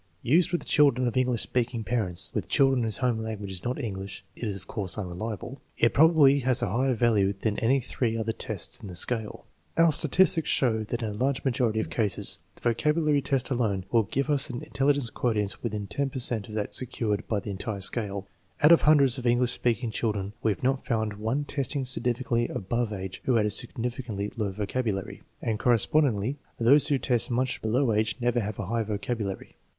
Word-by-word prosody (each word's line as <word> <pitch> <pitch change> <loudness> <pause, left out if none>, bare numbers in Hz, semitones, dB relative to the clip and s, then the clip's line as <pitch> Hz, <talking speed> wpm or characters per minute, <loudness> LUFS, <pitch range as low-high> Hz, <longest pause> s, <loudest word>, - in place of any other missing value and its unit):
Used 165 +9 +3
with 175 - -1
children 135 -5 +3
of 120 - -3
English 125 -3 +1
speaking 120 -2 -1
parents 105 -7 0
(with - - -2
children 135 -2 +3
whose 110 -3 -1
home 125 -4 0
language 110 -3 -5
is 90 -2 -5
not 125 +3 -2
English 100 -5 -6
it - - -14
is 105 -3 -2
of 95 - -9
course 100 -5 -2
unreliable), 105 +6 -5 0.2
it 115 - +3
probably 150 -3 +6
has 130 -1 +1
a - - 0
higher 130 +2 +1
value 105 -4 +2
than 105 0 -1
any 130 +4 +3
three 120 -2 -2
other 115 0 -1
tests - - -5
in - - -8
the 90 - -8
scale. 110 +4 0 0.3
Our 165 0 +5
statistics 160 +1 +2
show 110 -4 +2
that 120 +2 -4
in 110 - -1
a - - -5
large 130 +5 -1
majority 120 -4 +1
of - - -3
cases 105 -5 +1 0.2
the - - -13
vo 120 - +3
cabulary 150 +2 +1
test 135 -1 -1
alone 105 -7 0
will 115 - +4
give 135 +7 -2
us 145 -3 +2
an 120 -1 -5
intelligence 140 -3 0
quotient 105 -5 -1
within 105 -3 -3
10 140 +7 -2
per 135 - -7
cent 120 -4 -1
of 105 - -7
that 105 -1 -3
secured 115 -5 -1
by 105 - 0
the 100 - -6
entire 100 +1 -4
scale. 100 -1 -1 0.4
Out 150 - +8
of 170 - +7
hundreds 140 -5 +4
of 125 - -3
English 120 +1 +3
speaking 120 -1 -1
children 105 -3 -2
we 110 - +2
have 100 - -5
not 130 +1 +1
found 110 -3 -1
one 110 +8 -2
testing 140 -1 -2
significantly 120 -1 0
above 115 +3 -2
age 95 -2 -6
who 130 - +2
had 110 -2 +3
a - - +1
signifi 120 +3 -2
cantly 105 -3 -5
low 105 -4 -2
vocabulary; 105 0 -3 0.2
and 110 -2 -1
correspondingly, 125 +1 +2 0.2
those 135 +6 +5
who 140 - +2
test 125 -3 +2
much 130 +1 -1
below 115 +2 +1
age 110 +1 +1
never 120 0 +1
have 105 -2 -4
a 100 - -4
high 115 +5 -1
vocabulary. 105 -1 -4
115 Hz, 205 wpm, -27 LUFS, 105-130 Hz, 0.4 s, Out